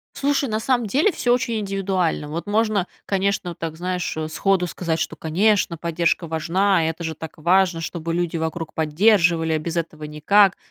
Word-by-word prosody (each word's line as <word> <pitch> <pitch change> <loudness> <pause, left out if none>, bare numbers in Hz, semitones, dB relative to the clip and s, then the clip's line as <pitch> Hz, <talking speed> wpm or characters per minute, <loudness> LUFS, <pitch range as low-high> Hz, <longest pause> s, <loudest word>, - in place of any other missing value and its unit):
Слушай, 280 -1 0
на 215 0 -1
самом 240 0 0
деле, 290 - +2
всё 245 -7 +1
очень 235 -2 0
индивидуально. 195 -6 -1
Вот 170 +6 -5
можно, 210 -3 +1 0.2
конечно, 195 -2 0
вот 170 - -12
так, 165 -1 -4
знаешь, 180 -1 -3
э, 155 0 -2
сходу 190 +3 +1
сказать, 165 -2 -2
что, - - -2
конечно, 185 +2 +1
поддержка 170 +1 0
важна, 170 +2 +1
это 165 +1 -4
же 160 -1 -3
так 160 +1 -9
важно, 175 +1 +2
чтобы 165 0 -4
люди 170 -1 -1
вокруг 160 0 -4
поддерживали, 165 0 +3
а 155 - +1
без 170 +2 -4
этого 155 -2 -4
никак. 190 +7 +3
175 Hz, 180 wpm, -22 LUFS, 160-200 Hz, 0.2 s, поддерживали